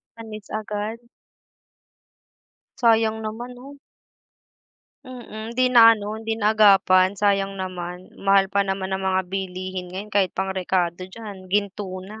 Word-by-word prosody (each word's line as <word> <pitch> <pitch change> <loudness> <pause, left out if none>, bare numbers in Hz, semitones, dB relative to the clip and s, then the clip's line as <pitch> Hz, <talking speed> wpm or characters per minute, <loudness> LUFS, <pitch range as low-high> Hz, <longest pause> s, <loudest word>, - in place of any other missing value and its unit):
Panis 220 -2 -10
agad. 215 +1 -4 1.8
Sayang 225 -3 +3
naman 225 +3 -6
'no? 275 +3 -13 1.2
Mm, 235 -4 -8
hindi 255 - +3
na 230 -2 +8
ano, 210 0 -5
hindi 225 0 -3
naagapan. 200 -3 +4
Sayang 195 -1 +1
naman, 180 -1 -6
mahal 195 0 +3
pa 200 - +3
naman 190 -1 -2
ng 190 - -1
mga 190 0 +1
bilihin 185 -1 -4
ngayon 200 +4 -8
kahit 200 -2 +3
pang 190 0 -1
rekado 180 -2 -1
diyan, 195 -2 -10
ginto 200 0 -1 0.2
na. 215 +3 -10
200 Hz, 130 wpm, -23 LUFS, 190-220 Hz, 1.8 s, na